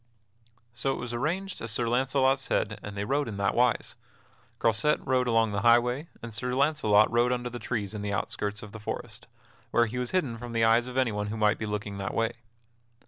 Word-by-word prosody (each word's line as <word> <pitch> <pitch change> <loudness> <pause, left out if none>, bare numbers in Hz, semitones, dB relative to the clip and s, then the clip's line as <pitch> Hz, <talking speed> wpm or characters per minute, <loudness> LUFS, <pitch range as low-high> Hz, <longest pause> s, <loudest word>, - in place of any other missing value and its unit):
So 120 +3 -1
it - - -4
was 120 -1 -5
arranged 175 +10 -2
as 115 - -3
Sir 115 +2 0
Launcelot 130 +2 +2
said 110 -5 -1
and 105 -1 -8
they 100 - -2
rode 140 +5 0
in 105 -3 -5
that 100 - +1
wise: 125 0 +1 0.6
Croisette 115 +7 +2
rode 130 -2 +2
along 115 -2 +3
the 100 -1 -1
highway, 120 +6 +3 0.2
and 115 -1 -6
Sir 125 +3 -2
Launcelot 130 -8 +4
rode 120 +1 +3
under 125 0 -2
the 120 - -6
trees 110 -5 -3
in 105 - -5
the 105 0 -3
outskirts 100 +1 -3
of 105 - -9
the 110 - -9
forest, 105 - -6 0.4
where 120 - +3
he 120 +3 -4
was 125 - -2
hidden 135 -11 -1
from 120 0 -7
the 115 0 +2
eyes 115 +2 +4
of 125 +1 -6
anyone 105 -5 +1
who 110 +2 -4
might 105 -1 +2
be 110 - -3
looking 105 -1 -4
that 95 - -3
way. 115 +1 +1
115 Hz, 215 wpm, -28 LUFS, 105-125 Hz, 0.6 s, Launcelot